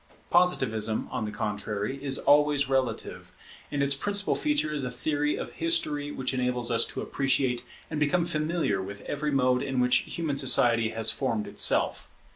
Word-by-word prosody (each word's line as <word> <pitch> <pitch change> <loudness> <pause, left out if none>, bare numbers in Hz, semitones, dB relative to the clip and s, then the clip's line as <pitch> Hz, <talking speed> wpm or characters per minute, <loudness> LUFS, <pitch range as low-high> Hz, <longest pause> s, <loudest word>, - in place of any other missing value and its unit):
Positivism, 115 -12 +2
on 110 - -2
the 105 - -4
contrary, 105 +5 -3
is 135 -2 -1
always 145 -1 +3
relative; 130 -4 -2 0.4
and 145 -1 0
its 140 0 +2
principal 200 +8 0
feature 295 - 0
is 145 -2 -3
a 125 - -2
theory 145 +4 -1
of - - -6
history 155 -3 +1
which 130 -2 -3
enables 125 -2 -1
us 115 - +3
to - - -5
appreciate 130 -3 0 0.2
and 155 - -4
become 160 +4 +2
familiar 155 - -1
with 100 +1 -8
every 150 +5 -3
mode 130 -3 +2
in 135 -2 -2
which 125 0 +4
human 155 -4 -2
society 115 -4 +3
has 115 0 0
formed 115 -6 -2
itself. - - 0
135 Hz, 165 wpm, -27 LUFS, 120-150 Hz, 0.4 s, which